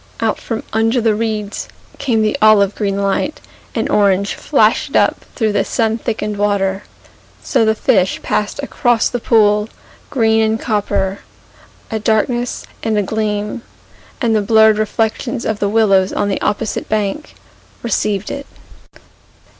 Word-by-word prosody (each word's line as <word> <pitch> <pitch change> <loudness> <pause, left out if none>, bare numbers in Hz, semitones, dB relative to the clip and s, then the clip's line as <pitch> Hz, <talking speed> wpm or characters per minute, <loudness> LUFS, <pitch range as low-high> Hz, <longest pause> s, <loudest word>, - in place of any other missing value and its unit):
Out - - 0
from 225 -1 -4
under 225 +3 +2
the 225 -2 +2
reeds 215 -1 -3 0.3
Came 225 -5 +1
the 215 - +1
olive 210 -2 +5
green 200 -2 -2
light, 200 +9 -1 0.4
And - - 0
orange 200 -1 +2
flashed - - +1
up - - +2
Through 220 -4 +1
the 205 - +1
sun 225 -1 0
thickened 215 -3 -3
water. 200 -1 0 0.6
So 225 - +2
the 220 0 +2
fish 190 -3 +1
passed 210 +6 -1
across 240 -4 +1
the 245 - -3
pool, 210 -2 +3 0.4
Green 225 -4 +2
and 220 0 +1
copper, 200 -3 -1 0.7
A 220 - -1
darkness 240 +3 0 0.2
and 220 -2 0
a 205 - +2
gleam, 210 +2 -2 0.6
And 230 -3 +1
the 215 - +2
blurred 220 +1 +4
reflections 225 +3 -1
of 215 -1 -1
the 200 - 0
willows 195 -3 +3
on 205 0 -1
the 195 - -2
opposite 210 +1 -2
bank 215 +7 -2 0.5
Received 210 -3 -1
it. 280 0 -6
215 Hz, 145 wpm, -17 LUFS, 205-225 Hz, 0.7 s, olive